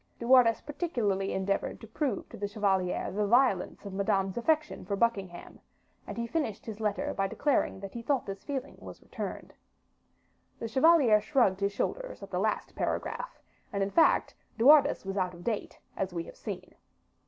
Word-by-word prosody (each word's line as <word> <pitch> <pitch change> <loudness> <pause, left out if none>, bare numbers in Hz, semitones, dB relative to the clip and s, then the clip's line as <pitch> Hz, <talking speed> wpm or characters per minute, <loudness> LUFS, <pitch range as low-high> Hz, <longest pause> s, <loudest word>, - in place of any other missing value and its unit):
De 235 - -6
Wardes 245 -3 +6
particularly 230 - -1
endeavored 195 +1 -1
to - - -10
prove 230 +1 -2
to - - -10
the 205 - -3
chevalier 195 -3 0
the 210 +1 0
violence 235 -5 +2
of 200 - -6
Madame's 195 -1 0
affection 305 +5 0
for 200 - -2
Buckingham, 195 -5 -2 0.5
and - - -6
he 235 - -1
finished 235 -6 -3
his 220 -2 -7
letter 210 -2 -1
by 195 0 0
declaring 280 -2 0
that 195 -1 -7
he 235 - -5
thought 270 +2 0
this 195 0 -7
feeling 280 -2 -4
was - - -11
returned. - - -6 1.0
The 230 - -4
chevalier 260 -4 +5
shrugged 215 -7 +2
his 200 0 +1
shoulders - - -3
at - - -10
the - - -1
last - - -1
paragraph, - - -3 0.3
and, 200 -1 0
in 195 - -2
fact, 325 - +4 0.2
De 230 - +1
Wardes 290 -5 +6
was 195 +1 -4
out 180 -2 -1
of 175 - -12
date, 220 -1 -3 0.2
as 190 -1 -2
we 170 - -2
have - - -12
seen. - - -7
215 Hz, 180 wpm, -30 LUFS, 195-260 Hz, 1.0 s, Wardes